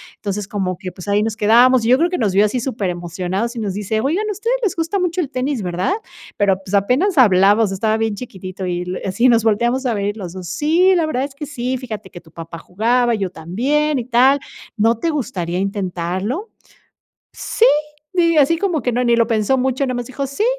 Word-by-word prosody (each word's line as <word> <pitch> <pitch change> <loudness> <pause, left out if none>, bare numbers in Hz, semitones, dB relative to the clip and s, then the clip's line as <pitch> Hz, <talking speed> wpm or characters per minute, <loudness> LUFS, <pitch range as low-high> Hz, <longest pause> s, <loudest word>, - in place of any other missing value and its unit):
Entonces, 205 -1 -4
como 190 -4 -2
que, 185 - -6
pues, 180 +1 -11
ahí 205 +1 +2
nos 220 0 -1
quedamos 245 +3 +5
y - - +1
yo 255 - +6
creo 340 +5 +2
que 360 - -2
nos 210 -5 0
vio 200 +2 +5
así 215 +4 -1
superemocionados 190 -1 -3
y - - -4
nos 205 -4 -2
dice: 210 +2 -2
"Oigan, 345 - 0
a - - 0
ustedes 460 +5 -1
les 400 - 0
gusta 330 +4 -1
mucho 360 0 0
el 290 - -4
tenis, 260 -2 -2
¿verdad?" 180 - -1 0.4
Pero, 200 -2 +3
pues, 190 +1 -9
apenas 265 - +2
hablaba, 205 -2 +5
estaba 215 +2 0
bien 225 -1 -1
chiquitito 190 -5 -7
y 180 0 -2 0.2
así 200 +7 +2
nos 230 -2 +4
volteamos 235 +4 +1
a 240 - +1
ver 205 +1 -2
los 180 -4 -7
2. 185 -2 -8
"Sí, 330 - +3
la 335 -3 +2
verdad 265 -4 -1
es 275 0 -6
que 295 - -6
sí, 255 -3 -3
fíjate 220 -6 -7
que 175 - -11
tu 160 - -20
papá 165 0 -9
jugaba, 235 +7 +1
yo 195 -3 -2
también 265 - -1
y 235 - -5
tal, 255 +3 +4 0.4
¿no 225 +2 +3
te 330 - 0
gustaría 190 - -2
intentarlo?" 195 - -3 0.8
"Sí," 460 - 0 0.5
y 335 -1 +3
así 300 +3 +4
como 345 -5 0
que 245 - 0
no 250 +1 0
ni 235 -1 +3
lo 230 -1 +3
pensó 225 +3 +1
mucho, 260 +1 0
nomás 245 -2 -3
dijo: 275 +1 -4
"Sí, 275 +11 -2
230 Hz, 215 wpm, -19 LUFS, 195-275 Hz, 0.8 s, yo